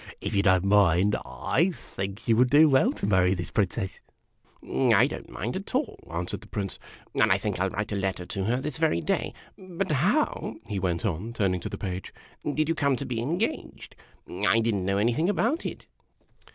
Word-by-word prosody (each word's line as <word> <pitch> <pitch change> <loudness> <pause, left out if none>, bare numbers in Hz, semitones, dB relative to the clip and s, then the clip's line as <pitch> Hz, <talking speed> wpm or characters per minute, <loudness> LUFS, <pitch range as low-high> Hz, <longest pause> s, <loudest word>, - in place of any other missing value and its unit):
If 100 - -4
you 100 - +3
don't 95 -2 +4
mind, 100 -1 +4
I 175 +4 0
think 100 - -7
you 115 - +4
would 125 +1 +4
do 150 +4 +7
\vell 135 -3 +4
to - - -4
marry 95 -2 +3
this 90 -1 -5
Princess." 95 0 -1 0.5
" - - -31
I - - +4
don't - - -6
mind 115 +6 -4
at 195 +6 -5
all," 270 0 -1
answered 85 +2 -3
the - - -14
Prince; 100 -3 -4 0.2
" - - -27
and - - +5
I - - +5
think - - -3
I 95 - +2
'11 95 - -4
write 105 +1 -2
a - - -1
letter 95 -2 -2
to 95 +1 -3
her 120 +4 +1
this 150 +2 -4
very 160 - +2
day. 80 - -1 0.3
But 185 0 -4
how," 175 - +1
he 105 -3 -2
went 90 +1 -1
on, 105 +4 -2
turning 95 -5 0
to - - -5
the - - -6
Page, 95 -2 -5 0.2
" 145 - -5
did 155 0 +1
you 165 - +2
come 140 -4 +1
to - - -5
be 115 -2 -2
engaged? 170 - -3 0.3
I 115 - +2
did 115 0 +1
n't 95 -2 -1
know 100 +1 +1
anything 120 - +2
about 205 - 0
it - - -8
105 Hz, 220 wpm, -27 LUFS, 95-150 Hz, 0.5 s, do